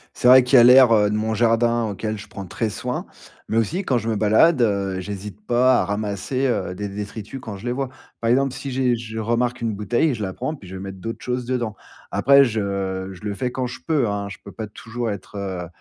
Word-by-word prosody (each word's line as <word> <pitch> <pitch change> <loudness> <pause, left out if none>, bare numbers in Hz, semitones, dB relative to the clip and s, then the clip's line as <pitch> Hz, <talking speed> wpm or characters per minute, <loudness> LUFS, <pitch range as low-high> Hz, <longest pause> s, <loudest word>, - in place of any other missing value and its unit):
C'est - - +1
vrai 130 0 +9
qu'il 125 +1 +4
y - - +10
a - - +8
l'air, 125 0 +8
heu, 105 -1 +4
de 105 - -1
mon 110 +1 -1
jardin 115 +1 +2
auquel 110 +1 -4
je - - -10
prends 100 - -8
très 110 +4 -2
soin, 125 +5 -4 0.4
mais 110 - 0
aussi 165 - 0
quand 130 -7 +1
je 115 0 -3
me 110 - 0
balade, 110 +8 +4
heu, 100 -4 0
j'hésite 100 +1 -7
pas 125 +2 +3
à - - -1
ramasser, 105 +6 -2
heu, 100 -7 -1
des 105 +2 -4
détritus 105 +4 -7
quand 105 -5 -7
je 105 - -11
les 120 - -1
vois. 135 +1 -2 0.3
Par 115 - 0
exemple, 135 +1 +2
si 135 +1 -6
j'ai 125 -2 +1
je 110 -1 -7
remarque 120 +2 0
une 115 -2 -1
bouteille, 120 +9 +1
je 110 - -6
la 95 -2 -2
prends 155 - -3
puis 100 - -12
je 95 - -8
vais 95 - -7
mettre 95 -1 -7
d'autres 115 +4 -6
choses 125 -1 -2
dedans. 120 -4 -2 0.4
Après 140 0 +6
je 100 -4 -2
je 95 - -12
le 105 -1 -2
fais 125 +3 -2
quand 130 0 -2
je 125 - -6
peux, 150 -8 +2
hein. 100 0 -3
Je 95 - -8
peux 100 - -10
pas 110 0 -6
toujours 115 +2 -5
être, 100 0 -7
heu, 95 -3 -4
110 Hz, 250 wpm, -22 LUFS, 100-125 Hz, 0.4 s, y